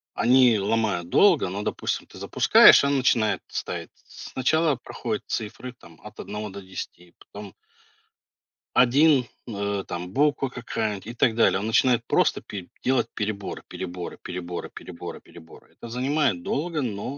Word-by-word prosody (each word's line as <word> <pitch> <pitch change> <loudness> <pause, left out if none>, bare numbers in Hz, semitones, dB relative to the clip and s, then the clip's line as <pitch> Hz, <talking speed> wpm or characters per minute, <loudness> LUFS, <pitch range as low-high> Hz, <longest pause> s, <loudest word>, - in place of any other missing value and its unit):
они 125 -2 +4
ломают 100 -4 -1
долго, 175 - +4
но, 100 +3 -4
допустим, - - -3
ты - - -14
запускаешь - - +6
и - - +2
она 140 0 +1
начинает 115 -4 +2
ставить. - - -5 0.2
Сначала 155 +3 0
проходит - - -5
цифры, 115 +3 -5
там, 85 -9 -18
от 105 0 -12
1 105 0 -5
до 100 +1 -9
10, 90 -2 -9
потом 100 -1 -11 1.2
1, 130 +2 +5 0.2
э, 100 -3 -3
там 90 +1 -5
буква 145 -2 +1
какая-нибудь, 110 -5 -4
и 115 - -6
так 115 -1 +2
далее. 115 -4 +3
Он 100 - -4
начинает 120 +1 +2
просто - - +1
пе 95 -3 -8 0.2
делать 130 -2 +1
переборы, 105 -2 -4
переборы, 90 -1 -7
переборы, 90 -1 -6
переборы, - - -9
переборы. 80 -1 -16
Это 115 - -11
занимает 125 - 0
долго, 155 - -2
но, 120 +3 -4
110 Hz, 145 wpm, -25 LUFS, 100-130 Hz, 1.2 s, запускаешь